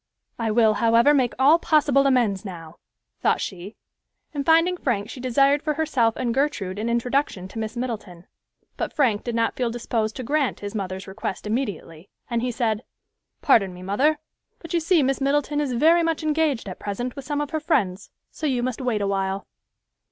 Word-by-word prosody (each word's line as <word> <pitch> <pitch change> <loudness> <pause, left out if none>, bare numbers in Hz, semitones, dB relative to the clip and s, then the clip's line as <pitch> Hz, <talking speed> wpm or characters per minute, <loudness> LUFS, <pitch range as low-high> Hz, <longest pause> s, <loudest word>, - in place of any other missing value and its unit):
"I 230 -1 0
will, 220 0 +4
however, 230 +6 +4
make 255 -4 +1
all 285 +6 +5
possible 285 -4 +3
amends 230 -8 +2
now," 170 -4 -9 0.4
thought - - +2
she, 190 +2 -6 0.6
and 285 -2 -2
finding 330 +4 +4
Frank 235 - -2
she - - -9
desired 275 +3 +3
for 305 -1 -1
herself 260 -8 +1
and 240 -2 -1
Gertrude 230 -9 -1
an 225 +2 -2
introduction 235 -5 0
to 225 - -7
Miss 220 +2 -4
Middleton; 210 -8 -5 0.5
but - - -3
Frank 235 -8 +1
did 240 -2 -3
not 230 -1 +1
feel 245 -2 0
disposed 230 -2 -2
to 255 - -5
grant 285 +1 0
his 205 0 -5
mother's 190 -2 -4
request 190 0 -5
immediately, 205 - -4 0.2
and 235 -1 0
he 250 - -1
said, 230 -2 -1 0.6
"Pardon 200 - +3
me, 180 - -10
mother, 270 +11 +2 0.4
but 335 - -9
you 340 - +3
see 330 -1 +3
Miss 270 +1 0
Middleton 290 +1 +1
is 275 -4 -2
very 325 +8 +4
much 330 -1 -1
engaged 305 -7 0
at 185 - -7
present 240 +5 -4
with 275 - -7
some 290 +1 -2
of 295 -1 -3
her 315 - -1
friends, 200 - 0 0.2
so 310 - -3
you 250 -3 0
must 255 0 -3
wait 240 -5 0
awhile." 195 0 -1
240 Hz, 190 wpm, -24 LUFS, 210-285 Hz, 0.6 s, all